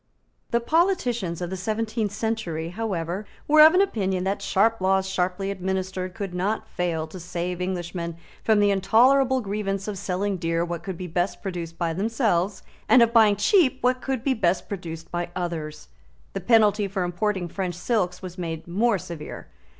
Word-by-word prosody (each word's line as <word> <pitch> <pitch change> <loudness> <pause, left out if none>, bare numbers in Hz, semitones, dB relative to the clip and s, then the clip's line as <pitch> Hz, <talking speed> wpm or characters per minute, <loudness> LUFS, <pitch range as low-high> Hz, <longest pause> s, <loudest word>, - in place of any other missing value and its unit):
The 235 - +2
politicians 240 - +1
of 175 - -4
the - - -2
seventeenth 215 +2 -2
century, 200 -7 -2
however, 190 -1 -3 0.2
were 305 +1 +7
of 315 +3 +9
opinion 195 - +1
that 195 +2 -1
sharp 220 +2 +2
laws 190 0 +2
sharply 190 +1 -1
administered 185 -1 -3
could 200 -5 -5
not 195 +5 -1
fail 170 -3 -2
to 170 +4 -10
save 180 +1 -4
Englishmen 175 -2 -3 0.3
from 220 -2 +4
the 205 0 +4
intolerable 255 +7 +4
grievance 195 -1 -3
of 205 -3 -4
selling 195 +1 -1
dear 165 0 0
what 170 -1 -4
could 190 -3 -6
be 185 - -5
best 175 +2 -2
produced 170 -4 -5
by 170 -1 -1
themselves, 200 -2 0 0.3
and 250 -3 +8
of 230 0 +1
buying 220 -3 +6
cheap 260 - +3
what 250 0 +1
could 265 -3 -2
be 270 - +2
best 180 -6 0
produced 165 -4 -7
by 175 0 -2
others. 160 -4 -4 0.4
The 195 - -3
penalty 210 0 +4
for 195 -1 -2
importing 180 +1 -1
French 180 0 -3
silks 180 -2 -1
was 185 0 -7
made 165 -2 -4
more 210 +5 +2
severe. 170 -4 -8
190 Hz, 170 wpm, -25 LUFS, 175-220 Hz, 0.4 s, of